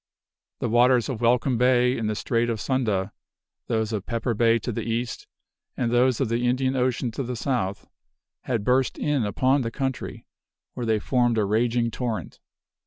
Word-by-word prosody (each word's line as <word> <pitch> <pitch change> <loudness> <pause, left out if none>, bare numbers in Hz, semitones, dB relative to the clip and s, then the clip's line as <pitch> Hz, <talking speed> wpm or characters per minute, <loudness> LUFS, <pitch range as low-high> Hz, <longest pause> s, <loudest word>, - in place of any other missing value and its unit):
"The - - 0
waters 120 +1 +4
of 120 -4 -4
Welcome 120 +1 +2
Bay, 125 0 +3
in 110 - -2
the 110 - -1
Strait 115 +2 0
of 115 -2 -2
Sunda, 105 -8 -1 0.5
those 110 -1 -1
of 100 -3 -3
Pepper 115 0 -1
Bay 115 +1 +3
to 115 - -4
the 115 - -3
east, 115 +2 -3 0.5
and 120 -2 0
those 125 0 +3
of 135 - +1
the 120 +2 0
Indian 130 +1 +1
Ocean 125 -1 0
to 125 - -4
the 125 -1 -4
south, 115 -6 -2 0.6
had 115 -5 -1
burst 130 +3 +1
in 145 -5 0
upon 130 +6 +2
the 115 - -2
country, 135 +1 -4 0.5
where 120 -2 -4
they 110 -1 +3
formed 120 +1 +1
a 105 - +2
raging 115 +3 +1
torrent." 110 - -4
120 Hz, 175 wpm, -25 LUFS, 115-125 Hz, 0.6 s, waters